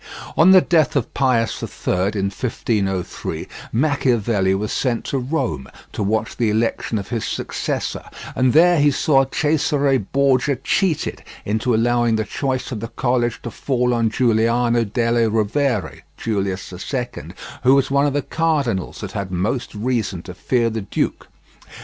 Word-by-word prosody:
On 165 +4 +6
the 190 -1 +8
death 155 -7 +2
of 140 - -1
Pius 125 -4 +1
III, - - -3 0.3
in 100 0 0
1503, 100 -6 -2 0.2
Machiavelli 120 -8 +1
was 105 +2 -2
sent 120 -4 -1
to 135 - -1
Rome 125 - -2 0.3
to - - -4
watch 110 +2 -1
the 115 -3 +1
election 110 +1 0
of 100 - -5
his 115 -3 -2
successor, - - -3 0.3
and 130 -1 +3
there 170 +2 +5
he 145 0 +5
saw 135 0 +3
Cesare 145 -2 +1
Borgia 135 +4 +1
cheated 160 +6 -1 0.2
into 110 +3 0
allowing 120 0 +2
the 110 - 0
choice 130 +5 -3
of 115 - -3
the 115 - -4
College 120 0 -1
to 120 - -5
fall 125 +1 0
on 115 -1 +2
Giuliano 115 0 +2
delle 115 +1 +1
Rovere 110 +1 0 0.2
(Julius 95 -4 -2 0.2
II), 125 -3 -4 0.3
who 130 +2 +5
was 135 -1 +1
one 140 +1 +3
of 140 - -1
the 145 -1 0
cardinals 145 - -1
that - - -5
had 100 -2 -4
most 105 +7 -2
reason 105 -6 -2
to 90 - -8
fear 115 +5 0
the 110 0 -3
duke. 95 - -2
120 Hz, 155 wpm, -20 LUFS, 110-135 Hz, 0.3 s, the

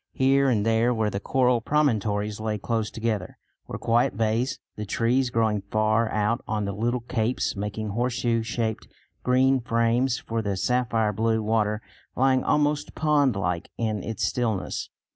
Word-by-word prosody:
Here 135 +1 +3
and 110 -4 +1
there, 115 +2 +2
where 110 -2 0
the 100 - -2
coral 125 +1 +2
promontories 110 -7 0
lay 110 -1 -2
close 110 +1 -2
together, 110 -5 -3 0.3
were - - -5
quiet 115 -2 +1
bays, 115 +4 0 0.2
the 105 - -5
trees 120 +5 +1
growing 110 -3 +1
far 110 +1 +2
out 110 +3 0
on 105 -1 -1
the 100 - -2
little 120 +4 -1
capes 120 0 -1
making 105 +1 -4
horseshoe 120 +1 0
shaped 110 -1 -3 0.3
green 130 +1 +3
frames 115 +1 +1
for 115 0 -3
the 100 -3 -2
sapphire 115 0 +1
blue 110 +1 +1
water 105 0 0 0.3
lying 130 0 +3
almost 150 0 +1
pond 145 -6 +2
like 90 -2 -2
in 110 -3 -1
its 115 +4 -4
stillness. 110 -7 -2
115 Hz, 155 wpm, -25 LUFS, 105-125 Hz, 0.3 s, Here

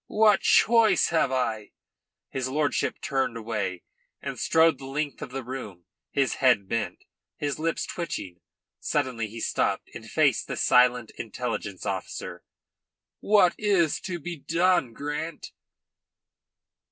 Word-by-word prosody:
"What 210 -2 +4
choice 230 -1 +5
have 160 -5 +2
I?" 115 -5 -2 0.6
His 130 -1 -2
lordship 145 +2 0
turned 135 -4 -1
away, 105 -5 -3 0.4
and - - -6
strode 160 -3 +4
the 135 - -8
length 145 +1 -3
of - - -5
the 135 +1 -5
room, 110 -9 -7 0.2
his 135 -2 0
head 125 -7 +4
bent, 115 -1 -3 0.3
his 145 0 -2
lips 165 +1 -1
twitching. 100 - -5 0.4
Suddenly 130 -6 -1
he 115 +2 -9
stopped - - -1
and - - -9
faced - - +2
the - - -4
silent 125 -2 +4
intelligence - - -4
officer. - - -5 0.8
"What 200 -4 +4
is 190 -7 +2
to 180 -2 -4
be 170 +2 -6
done, 170 -4 +1
Grant?" 150 +5 -5
135 Hz, 130 wpm, -26 LUFS, 115-165 Hz, 0.8 s, choice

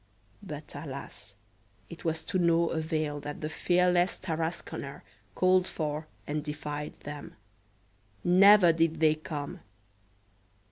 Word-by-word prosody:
But, 155 -6 -8
alas!! 140 -7 -8 0.5
it 170 - -11
was 160 -1 -1
to 185 - -1
no 170 -1 +3
avail 155 -2 -1
that 145 0 -6
the 155 - -2
fearless 180 +1 +2
Tarasconer 160 -4 -4 0.3
called 185 0 +4
for 155 0 -3 0.2
and 150 0 -2
defied 150 0 -5
them; 145 0 -8 0.9
never 185 0 +7
did 165 -1 +1
they 155 -1 +5
come. 150 -2 -6
160 Hz, 110 wpm, -29 LUFS, 150-175 Hz, 0.9 s, never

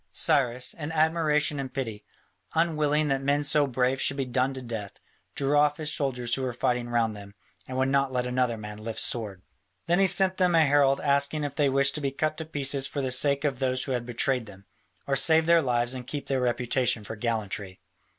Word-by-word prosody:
Cyrus, 125 -2 +2
in 155 -1 -6
admiration 155 -2 +1
and 135 -2 -5
pity, 110 -6 -5 0.5
unwilling 155 -2 +1
that 135 0 0
men 140 +2 +1
so 145 0 +3
brave 130 +1 0
should 135 - +1
be 135 - -1
done 125 +1 0
to 130 - -6
death, 110 -4 -6 0.4
drew 140 +1 0
off 145 0 +3
his 150 -1 -3
soldiers 125 -4 -2
who 135 - 0
were 130 -2 -2
fighting 120 0 -1
round 115 -2 0
them, 100 0 -12 0.3
and 130 - -5
would 130 0 +1
not 135 -1 +1
let 125 -1 -1
another 125 -2 0
man 105 0 -8
lift 115 0 -4
sword. 105 -6 -1 0.4
Then 175 +2 +2
he 195 - +5
sent 190 0 +2
them 180 -2 +2
a 160 -1 +5
herald 140 -1 +3
asking 140 +1 +1
if 145 -1 -3
they 145 -1 +1
wished 140 +1 +2
to 150 - -4
be 140 - 0
cut 155 +3 -2
to 160 - -5
pieces 140 -3 -1
for 145 - -5
the 130 - -2
sake 140 +2 +2
of 140 -4 -1
those 130 -1 0
who 135 - -5
had 120 -2 -2
betrayed 125 0 0
them, 100 -1 -14 0.4
or 135 - 0
save 160 +4 +4
their 170 0 +5
lives 120 -2 +1
and 125 -1 -7
keep 145 -2 -5
their 135 -2 -1
reputation 125 -1 0
for 110 - -7
gallantry? 105 -4 -4
135 Hz, 220 wpm, -27 LUFS, 120-145 Hz, 0.5 s, he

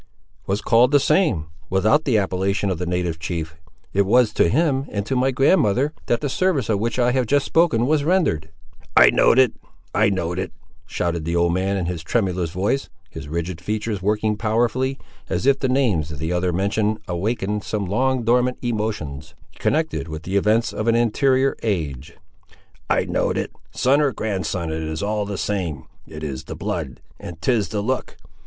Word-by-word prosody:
"Was 100 +2 0
called 120 +4 +4
the 145 - +6
same, 140 - +2 0.2
without 110 - +2
the 125 -6 +3
appellation 95 0 0
of 90 - -3
the 90 - -3
native 90 -2 -1
chief. 80 -1 -4 0.4
It 100 - +3
was 115 +2 +3
to - - +3
him, 140 - +1
and 100 -1 -2
to 135 - -2
my 130 +1 +2
grandmother, 135 - +2
that 120 - +1
the 145 - -1
service 145 - 0
of 105 -3 +1
which 115 +2 -1
I 125 -1 +3
have 130 -2 0
just 145 +2 +2
spoken 160 -9 +3
was 150 +1 +2
rendered." 150 - +1 0.5
"I - - +8
know'd - - +4
it! 130 -3 +5 0.4
I - - +3
know'd 90 -2 -2
it!" 95 - -4 0.3
shouted 85 -2 -2
the 85 +2 -2
old 85 0 +2
man, 95 +2 0
in 90 - -1
his 85 -2 -3
tremulous 90 -2 -1
voice, 100 +11 -1 0.2
his 70 - -8
rigid 85 +2 -4
features 105 +1 -3
working 105 +2 0
powerfully, 120 +4 0 0.3
as 90 +8 -1
if 140 0 +4
the 130 - 0
names 110 - +1
the 80 +4 -2
other 90 0 0
mentioned 105 +4 0
awakened 105 +3 -2
some 105 -2 -2
long 130 +6 0
dormant 125 +2 +2
emotions, 105 - -3 0.2
connected 160 - 0
with 80 0 -7
the 95 +3 -4
events 110 +3 +2
of 110 - -3
an 115 - +4
anterior 130 +3 +2
age. 75 - -3 0.7
"I - - +2
know'd - - 0
it! - - -2 0.2
son 140 +4 +2
or 145 -2 +2
grandson, 95 -6 -2
it 80 0 -3
is 80 +2 -4
all 105 0 -1
the 100 -1 -4
same; 90 -11 -3 0.2
it 75 0 -9
is 70 -4 -5
the - - -7
blood, 65 - -4 0.2
and 85 -2 -9
'tis 105 +4 +1
the 105 -2 -2
look! 130 +5 -3
105 Hz, 185 wpm, -22 LUFS, 90-125 Hz, 0.7 s, I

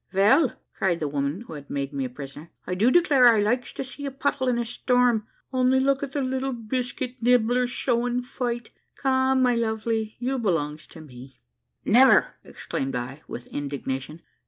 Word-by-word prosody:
"Vell," 215 - +4 0.2
cried 175 -3 0
the 155 - -1
woman 140 +5 -2
who 235 - -10
had 145 -2 -10
made 140 0 -3
me 135 -1 -2
a - - -4
prisoner, 140 +5 -10 0.2
"I 180 - -3
do 210 +7 +3
declare 280 -5 +5
I 230 -3 +6
likes 240 +5 0
to - - -4
see 270 +2 -9
a - - -1
puddle 270 -1 -1
in 245 -1 +2
a 235 - -1
storm 245 -2 +1 0.3
only 255 0 +3
look 275 +1 +2
at 275 -1 -5
the 285 - -1
little 265 +1 -2
biscuit 245 +2 -4
nibbler 245 +1 +3
showing 245 0 0
fight! 240 -2 -4 0.2
Come, 265 -1 +2
my 250 -1 +4
lovey, 220 -1 -1
you 255 +2 -2
belongs 160 -7 -1
to 160 - -12
me." 130 -2 -13 0.5
"Never!" - - +5
exclaimed 135 -1 -5
I 130 +4 -5
with 120 - -7
indignation. 140 +2 -4
235 Hz, 180 wpm, -25 LUFS, 155-255 Hz, 0.5 s, I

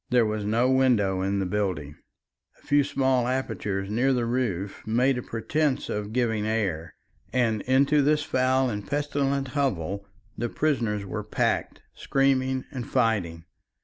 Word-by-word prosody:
There 125 -2 +4
was 105 -1 -2
no 115 +4 +2
window 115 -8 +3
in 100 +1 0
the 95 - 0
building; 90 -7 -2 0.6
a - - -25
few 145 0 +4
small 130 -3 +1
apertures 105 -7 -2
near 130 +5 +2
the 120 -2 0
roof 105 -6 -2
made 125 +3 +2
a - - -4
pretence 140 +5 -1
of 105 0 -3
giving 110 -3 0
air, 95 -7 -2 0.4
and 115 -4 +1
into 140 +3 +4
this 150 +1 +2
foul 130 -2 +2
and 105 -4 -3
pestilent 140 +1 -1
hovel 100 - -2 0.3
the 120 +1 -2
prisoners 115 -10 0
were 95 - -4
packed, - - -1
screaming 130 -1 +1
and 125 -3 -6
fighting. 100 -10 0
120 Hz, 145 wpm, -26 LUFS, 105-130 Hz, 0.6 s, There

